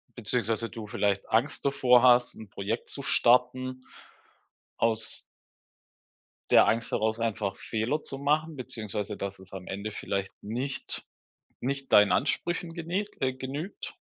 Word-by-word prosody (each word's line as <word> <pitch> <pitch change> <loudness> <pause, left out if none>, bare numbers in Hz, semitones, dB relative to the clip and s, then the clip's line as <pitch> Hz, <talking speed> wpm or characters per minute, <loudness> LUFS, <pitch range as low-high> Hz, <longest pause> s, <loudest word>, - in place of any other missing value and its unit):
beziehungsweise 115 0 -1
du 110 -2 -8
vielleicht 100 -1 0
Angst 120 +8 +1
davor 125 -3 +5
hast, 125 -1 +5
'n 110 -3 -11
Projekt 105 +4 -3
zu 140 - -1
starten 130 +1 +2 0.9
aus 110 -1 0 1.3
der - - +7
Angst 115 +1 0
herraus 110 +1 +1
einfach 105 -4 -1
Fehler 120 +7 -1
zu 135 - -5
machen, 155 +3 +1
beziehungsweise 110 -5 -3
dass 100 -1 -5
es 95 0 -15
am 95 -1 -7
Ende 100 +2 -4
vielleicht 100 -2 -3
nicht 125 +6 -4 0.6
nicht 135 +1 -3
deinen 105 -2 +7
Ansprüchen 170 - 0
gene 175 +4 -2 0.2
äh, 130 -1 +1
genügt? 140 +8 -6
120 Hz, 130 wpm, -28 LUFS, 105-135 Hz, 1.3 s, der